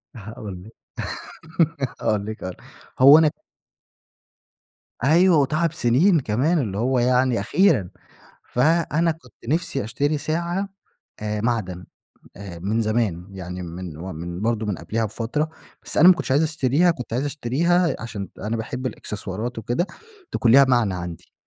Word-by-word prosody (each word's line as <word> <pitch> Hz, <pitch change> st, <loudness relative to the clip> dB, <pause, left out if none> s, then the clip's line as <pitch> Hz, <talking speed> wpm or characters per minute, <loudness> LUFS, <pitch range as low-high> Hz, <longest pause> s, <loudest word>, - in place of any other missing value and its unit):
هاقول 105 Hz, -4 st, -8 dB
لِك 110 Hz, +3 st, -14 dB, 1.3 s
هاقول 105 Hz, -2 st, 0 dB
لِك 110 Hz, +1 st, -6 dB
هاقول 95 Hz, -1 st, -5 dB
لِك -, -, -21 dB, 0.4 s
هو 140 Hz, +3 st, +10 dB
انا 160 Hz, -2 st, +4 dB, 1.7 s
أيوه 170 Hz, +5 st, +5 dB
وتعب 155 Hz, +3 st, +1 dB
سننين 155 Hz, +7 st, +3 dB
كمان 135 Hz, +8 st, +1 dB
اللي 105 Hz, -8 st, -2 dB
هو 125 Hz, +3 st, +1 dB
يعني 125 Hz, -1 st, +2 dB
أخيرًا، 105 Hz, -, +2 dB, 0.6 s
فأنا 165 Hz, +4 st, +2 dB
كنت 140 Hz, -8 st, -13 dB
نفسي 145 Hz, -2 st, 0 dB
أشتري 145 Hz, +8 st, -1 dB
ساعة 170 Hz, +6 st, -2 dB, 0.5 s
آآ 105 Hz, 0 st, -3 dB
معدن 100 Hz, -6 st, -2 dB, 0.5 s
آآ 95 Hz, -3 st, -8 dB
من 105 Hz, +6 st, -1 dB
زمان 110 Hz, -6 st, -1 dB
يعني 90 Hz, -1 st, -7 dB
من 85 Hz, -1 st, -7 dB
من 85 Hz, +1 st, -6 dB
برضه 110 Hz, -1 st, 0 dB
من 100 Hz, -4 st, -2 dB
قبليها 110 Hz, +7 st, -2 dB
بفترة، 115 Hz, +8 st, -2 dB, 0.3 s
بس -, -, -5 dB
أنا 170 Hz, -, +8 dB
ما 185 Hz, -, +9 dB
كنتش 175 Hz, -, -5 dB
عايز 140 Hz, +4 st, +4 dB
أشتريها، 155 Hz, +2 st, +2 dB
كنت 125 Hz, -9 st, -5 dB
عايز 125 Hz, +4 st, 0 dB
أشتريها 160 Hz, +6 st, +1 dB
عشان 105 Hz, -4 st, -6 dB
أنا 110 Hz, +3 st, -2 dB
باحب 125 Hz, +4 st, -4 dB
الإكسسوارات 110 Hz, 0 st, -5 dB
وكده 120 Hz, -, -1 dB, 0.5 s
تكون 115 Hz, -, +3 dB
ليها 140 Hz, +2 st, +8 dB
معنى 120 Hz, -7 st, +2 dB
عندي، 90 Hz, -1 st, -7 dB
120 Hz, 145 wpm, -23 LUFS, 100-150 Hz, 1.7 s, هو